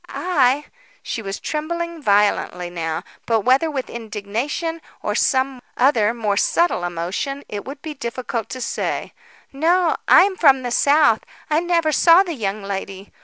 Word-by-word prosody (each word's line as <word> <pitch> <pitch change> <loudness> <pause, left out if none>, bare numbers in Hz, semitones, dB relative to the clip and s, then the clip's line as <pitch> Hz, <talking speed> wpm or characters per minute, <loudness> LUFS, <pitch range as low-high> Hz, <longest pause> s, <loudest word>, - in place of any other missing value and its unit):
"I?" 295 -5 +1 0.4
She 230 - -4
was 195 -1 -5
trembling 340 +2 -4
violently 200 -5 +1
now, 165 -2 -3 0.2
but 225 -2 +2
whether 260 +8 +3
with 270 -4 -3
indignation 235 +9 -4 0.2
or - - -1
some 260 -1 +1 0.2
other 240 -5 +3
more 215 -4 -1
subtle 340 - +2
emotion, 175 +11 -3
it 205 -1 -6
would 280 +2 -9
be 315 - -5
difficult 235 -4 -4
to 255 - -6
say. - - -3 0.4
"No, 335 +4 +2
I'm 385 +1 +6
from 270 -5 +5
the 245 - -3
South. 285 -3 +4 0.3
I 305 - +4
never 335 -2 +1
saw 335 +5 +6
the 350 -3 -4
young 210 -5 -3
lady. 195 0 -6
260 Hz, 150 wpm, -21 LUFS, 210-310 Hz, 0.4 s, I'm